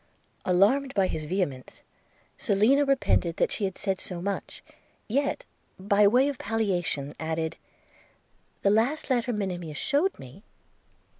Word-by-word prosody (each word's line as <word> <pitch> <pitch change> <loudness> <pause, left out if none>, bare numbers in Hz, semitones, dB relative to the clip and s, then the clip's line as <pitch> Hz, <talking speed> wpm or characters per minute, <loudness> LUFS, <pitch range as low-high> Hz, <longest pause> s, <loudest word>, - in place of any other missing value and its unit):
Alarmed 235 +10 +3
by 195 -2 +3
his 155 -4 -3
vehemence, 150 -7 -3 0.5
Selina 235 +9 +3
repented 255 -11 +1
that - - +1
she 205 - -1
had 190 -1 -4
said 195 -2 -1
so 180 -2 -4
much; 200 +3 -4 0.4
yet, 280 - -1 0.3
by 200 +2 +4
way 250 +6 +4
of 285 -3 -3
palliation, 175 -10 -1
added 160 0 -2 0.6
– - - -40
'The 200 - +4
last 245 +8 +1
letter 245 -1 +1
Monimia 180 -7 -3
shewed 300 - 0
me 130 +8 -12
200 Hz, 135 wpm, -27 LUFS, 175-250 Hz, 0.6 s, by